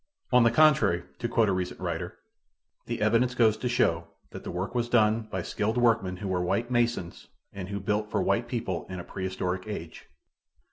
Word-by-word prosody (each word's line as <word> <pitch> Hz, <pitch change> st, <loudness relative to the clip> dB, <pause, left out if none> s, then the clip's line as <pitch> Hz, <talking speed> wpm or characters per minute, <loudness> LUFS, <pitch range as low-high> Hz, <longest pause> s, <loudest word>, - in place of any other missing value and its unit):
On 125 Hz, -, +7 dB
the 115 Hz, -, +6 dB
contrary, 140 Hz, -, +4 dB, 0.2 s
to 120 Hz, -, -1 dB
quote 115 Hz, -2 st, +2 dB
a -, -, +2 dB
recent 90 Hz, -1 st, -3 dB
writer, -, -, -4 dB, 0.7 s
"The -, -, -2 dB
evidence 120 Hz, +3 st, +2 dB
goes 110 Hz, -3 st, +4 dB
to 125 Hz, +3 st, -2 dB
show 85 Hz, -9 st, +1 dB, 0.2 s
that -, -, -9 dB
the -, -, -6 dB
work 90 Hz, +5 st, -3 dB
was 120 Hz, -1 st, -1 dB
done 110 Hz, -1 st, +3 dB
by 95 Hz, -2 st, -3 dB
skilled 110 Hz, +6 st, -1 dB
workmen 115 Hz, -6 st, +2 dB
who 100 Hz, -, -5 dB
were 90 Hz, -1 st, 0 dB
white 100 Hz, +7 st, -1 dB
masons 120 Hz, -7 st, -1 dB, 0.3 s
and 95 Hz, -2 st, -6 dB
who 100 Hz, 0 st, -3 dB
built 105 Hz, +2 st, -1 dB
for -, -, 0 dB
white 115 Hz, +5 st, +1 dB
people 120 Hz, -1 st, -3 dB
in 90 Hz, -1 st, -5 dB
a -, -, -6 dB
prehistoric 95 Hz, 0 st, -3 dB
age." 85 Hz, -6 st, -7 dB
105 Hz, 195 wpm, -28 LUFS, 95-120 Hz, 0.7 s, On